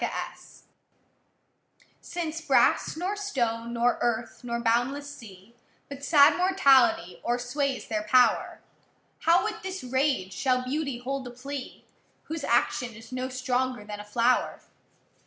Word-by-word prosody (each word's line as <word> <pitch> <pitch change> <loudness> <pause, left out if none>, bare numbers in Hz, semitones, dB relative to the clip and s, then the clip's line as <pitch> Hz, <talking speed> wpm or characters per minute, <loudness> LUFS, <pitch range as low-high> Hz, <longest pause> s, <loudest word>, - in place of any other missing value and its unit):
LXV - - -5 1.4
Since 330 -2 -4
brass, 320 - +2
nor 370 +5 -2
stone, 235 - -2
nor 235 +1 +1
earth, 240 +1 -2
nor 235 -1 -3
boundless 245 +5 0
sea, 205 -3 -14 0.4
But 280 0 -9
sad 285 -1 +6
mortality 270 - +3
oâersways 245 +3 -2
their 215 -1 -1
power, 245 +4 +2 0.6
How 335 +2 +4
with 430 0 -4
this 380 -3 -6
rage 260 -7 0
shall 255 -2 +1
beauty 275 0 -2
hold 260 +1 -4
a - - -6
plea, 255 +2 -8 0.4
Whose 320 -2 -6
action 240 0 0
is 225 +1 -13
no 255 0 -3
stronger 255 -2 -1
than 210 0 -7
a - - -7
flower? 235 +4 +1
255 Hz, 130 wpm, -27 LUFS, 235-285 Hz, 1.4 s, sad